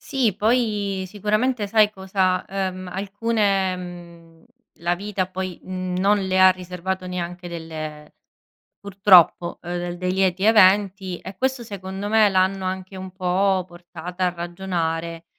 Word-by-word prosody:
Sì. 240 -8 0
Poi 210 -4 0
sicuramente 215 +4 0
sai 210 0 +4
cosa, 190 -2 0
ehm, 185 -1 -3
alcune 200 -1 0
mhmm, 170 -2 -11 0.4
la 170 +1 +1
vita 195 0 -3
poi, 185 -1 -5
mhmm, 185 -1 -4
non 205 +2 +3
le 190 0 0
ha 185 0 +8
riservato 185 +1 -4
neanche 180 0 -5
delle 155 -3 -7 0.7
purtroppo, 190 -3 +4
ehm, 175 0 -4
dei 180 +1 -2
lieti 190 0 +1
eventi, 195 -3 +4
e 190 0 -10
questo 260 -1 -1
secondo 195 -1 -6
me 215 0 +5
l'hanno 190 0 +1
anche 185 +1 -4
un 185 0 -7
po' 185 0 +1
portata 175 +1 -5
a - - +2
ragionare 170 -2 -3
185 Hz, 135 wpm, -23 LUFS, 175-200 Hz, 0.7 s, ha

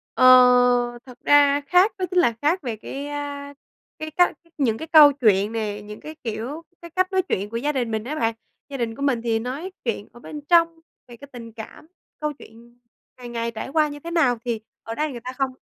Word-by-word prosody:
Ờ. 255 0 +8 0.6
Thật 250 -2 -13
ra 285 0 +5
khác 360 +8 +4
đó 370 - -1
chính 365 - +3
là 285 -10 +3
khác 325 +6 +1
về 240 -6 -4
cái, 275 +6 -7
a, 285 -1 -6 0.5
cái 310 0 -5
cách 355 +3 +2 0.2
những 235 -7 +1
cái 320 - -7
câu 300 -2 +8
chuyện 210 -6 +2
nè, 210 -2 -3
những 210 0 -10
cái 310 +1 -9
kiểu, 240 +8 -5 0.2
cái 340 - -11
cách 370 +3 0
nói 380 -1 +2
chuyện 205 - -3
của 230 - -4
gia 290 +5 -1
đình 245 -5 -2
mình 220 -1 -2
á 295 +5 -4
bạn. 230 -5 0 0.4
Gia 275 - -5
đình 230 -2 -3
của 280 - -10
mình 265 -5 +1
thì 230 -1 0
nói 275 +11 -5
chuyện 225 -3 -2
ở 240 - -14
bên 295 +4 -8
trong, 335 -1 +4 0.3
về 240 -1 -13
cái 280 - -12
tình 230 -2 -10
cảm, 225 +7 -11 0.3
câu 300 0 -2
chuyện 240 -2 -17 0.4
ngày 245 -1 -9
ngày 230 0 -3
trải 220 +3 -6
qua 305 +1 +2
như 290 0 -8
thế 335 +3 -8
nào 270 -9 +2
thì 230 -2 -2 0.2
ở 225 0 -6
đây 305 0 -1
người 245 - -7
ta 250 +2 -7
không 270 -1 0
265 Hz, 230 wpm, -23 LUFS, 230-305 Hz, 0.6 s, Ờ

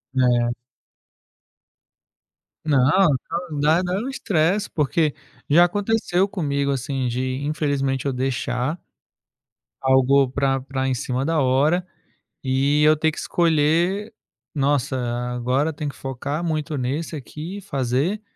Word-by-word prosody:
É. 120 -2 +3 2.2
Não, 145 -4 +3 0.7
não. 150 -2 -4
Dá 155 +4 +3
dá 180 -1 -2
um 215 +8 -2
estresse 195 - 0
porque 150 0 +1 0.4
já 165 +4 +7
aconteceu 200 0 0
comigo, 140 -7 -1
assim, 135 0 -2
de, 130 +2 -2
infelizmente, 140 -3 -1
eu 140 - 0
deixar 130 +3 -2 1.0
algo 130 0 +4
pra 135 0 +1
pra 135 0 -3
em 130 - +1
cima 130 +1 -2
da 165 0 +1
hora 145 +7 +2 0.6
e 140 +3 +2
eu 155 +1 +5
ter 160 +1 +2
que 155 - -10
escolher: 170 +6 +1 0.4
"Nossa, 140 -2 +1 0.4
agora 130 +6 0
tenho 150 -1 -4
que - - -15
focar 140 +4 -4
muito 155 -2 -2
nesse 145 +5 -3
aqui 155 +7 -7
e - - -7
fazer 140 - -1
145 Hz, 125 wpm, -22 LUFS, 130-165 Hz, 2.2 s, já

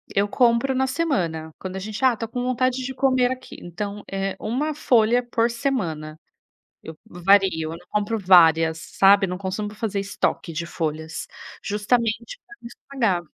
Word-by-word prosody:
eu 200 +1 +2
compro 240 +3 +2
na 265 +1 +1
semana. 180 - -1
Quando 190 0 -6
a 190 - -3
gente: 215 +5 -6
ah, 255 -2 +5
tô 225 - -4
com 245 +2 -4
vontade 255 +1 0
de 260 +1 -5
comer 255 -2 +2
aqui, 255 0 -7
então 200 +4 -6
é 195 0 -2
uma 285 +8 -2
folha 240 -4 +3
por 235 -1 0
semana. 170 - -3 0.7
Eu 160 - -9
vario, 195 +2 +4 0.2
eu 165 - -7
não 180 - -20
compro 210 +2 -1
várias, 165 -4 +5
sabe, 195 +4 +4
não 180 0 -4
costumo 205 +2 -4
fazer 210 -2 -3
estoque 195 -3 -2
de 165 +2 -3
folhas, 160 -1 -4 0.4
justamente 225 - -1
pra 415 - -14
não - - -10
estragar. 235 -7 -2
210 Hz, 165 wpm, -23 LUFS, 180-245 Hz, 0.7 s, ah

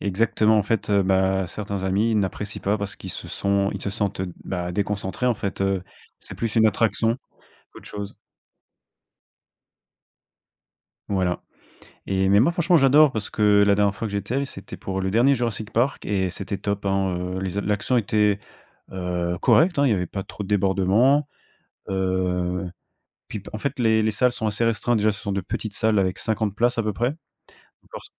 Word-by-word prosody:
Exactement, 110 +2 +2
en - - +3
fait, 110 0 -1
heu, 100 -1 +4
bah, 95 0 +2
certains 100 0 -4
amis 105 +4 +1
n'apprécient 100 +1 -2
pas 100 +2 +1
parce 100 -1 -4
qu'ils - - -8
se - - -6
sont 100 0 0
ils 100 - -6
se 100 - -2
sentent, 100 -2 -2
heu, 90 -2 -3
bah, 90 -1 -3
déconcentrés 100 +4 -2
en 120 - +3
fait, 100 -2 -5
heu, 95 -1 +1 0.4
c'est - - -9
plus 115 0 -3
une 110 0 +6
attraction 115 +2 +1 0.6
qu'autre - - -13
chose. 100 -1 -7 2.9
Voilà 95 -3 0 0.7
et 95 0 +2
mais, 100 +1 +6
moi 155 +9 +3
franchement 175 0 +3
j'adore, 145 +1 +6
parce 110 -4 -4
que 105 -1 +4
la 100 - +5
dernière 100 -1 +2
fois 115 - -4
que 100 - -7
j'étais 100 +4 -2
allé 140 +1 0
c'était 95 -7 -9
pour 95 0 -4
le 95 0 -1
dernier 125 +5 +4
Jurassic 115 -3 -3
Park 125 +5 0
et 95 -3 0
c'était 100 +2 -4
top 100 0 -3
hein, 95 -2 0 0.2
heu, - - -2
les 95 0 -3
a 100 - +1
l'action 105 +5 0
était, 105 -2 +2 0.5
heu, 90 -1 -2
correcte 170 -1 +4
hein. 140 - +4
Il - - +3
y - - +4
avait 90 -3 -1
pas 95 +2 -5
trop 105 - -7
de 95 - -7
débordements, 105 +8 +3 0.6
heu, 90 -1 -1 0.6
puis - - -5
bah, 100 - -11
en - - -3
fait 140 +4 -3
les 110 -2 +3
les 110 - +2
salles 125 +3 +2
sont 110 -2 -3
assez 105 +3 0
restreintes. 115 +1 +1
Déjà 105 0 +2
ce 100 - -8
sont 100 - -4
de 100 - -1
petites 100 +3 -5
salles 110 -2 +2
avec 95 -1 -1
50 110 -2 -1
places 120 +1 +1
à - - +2
peu 105 -1 -1
près. 120 +7 -1 0.8
Lors - - -8
100 Hz, 195 wpm, -23 LUFS, 95-115 Hz, 2.9 s, une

